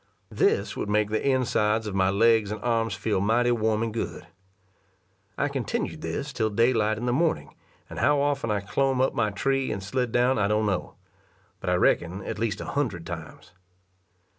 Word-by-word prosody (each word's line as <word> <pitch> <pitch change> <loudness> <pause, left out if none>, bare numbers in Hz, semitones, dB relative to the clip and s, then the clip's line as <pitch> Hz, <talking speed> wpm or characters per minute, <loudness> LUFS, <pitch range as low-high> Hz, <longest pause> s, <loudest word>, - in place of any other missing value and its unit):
This - - +1
would - - -4
make 105 0 +1
the 110 - 0
insides 110 -4 +1
of 105 - -4
my 95 -1 +2
legs 110 +1 +3
and 105 0 -4
arms 115 -2 0
feel 105 -4 -1
mighty 120 +4 +2
warm 110 -1 +1
and 115 -1 -3
good. 115 - -4 1.1
I 145 - +1
continued 155 - -3
this 140 -2 -4
till 110 -2 0
daylight 110 -1 +2
in 120 - -4
the 120 - +1
morning, 160 +4 0 0.3
and - - -7
how 145 -1 +3
often 140 -4 0
I 105 -1 0
clomb 135 +7 0
up 130 - +2
my 110 -3 +1
tree 135 +6 0
and 100 -2 -4
slid 125 +4 -1
down 125 +1 +2
I 100 - +2
don't 105 +1 +1
know, 95 -4 -2 0.6
but - - -3
I - - +3
reckon 90 +3 +1
at - - -5
least 110 -2 -1
a - - -5
hundred 115 -12 -2
times. 85 -1 -8
110 Hz, 190 wpm, -26 LUFS, 105-130 Hz, 1.1 s, legs